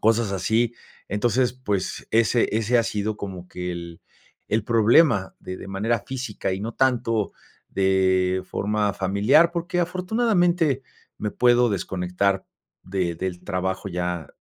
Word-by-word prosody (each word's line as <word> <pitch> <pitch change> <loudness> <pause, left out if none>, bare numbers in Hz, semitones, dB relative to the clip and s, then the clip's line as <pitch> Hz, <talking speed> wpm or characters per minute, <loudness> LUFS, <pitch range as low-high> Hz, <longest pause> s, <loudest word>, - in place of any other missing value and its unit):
cosas 115 -1 +2
así. 110 +5 +1 0.3
Entonces, 120 +5 +1
pues, 105 -7 -3
ese 115 +1 +3
ese 115 +2 +2
ha - - +4
sido 110 -2 -2
como 95 -3 -7
que 90 0 -5
el 85 -1 -8 0.5
el 110 0 0
problema 115 - +4
de 95 - -6
de - - -9
manera 110 +4 0
física, 125 -7 -3
y 95 - -3
no 110 +3 -4
tanto 120 -5 +1 0.4
de 95 -1 +2
forma 105 0 -1
familiar, 105 - +4
porque 175 +1 -2
afortunadamente 180 - +1 0.4
me 105 - -2
puedo 120 -1 +4
desconectar 95 0 -1 0.4
de 90 -2 -2
del 90 0 -4
trabajo, 95 0 -2
ya 90 -2 -3
105 Hz, 135 wpm, -24 LUFS, 95-120 Hz, 0.5 s, ha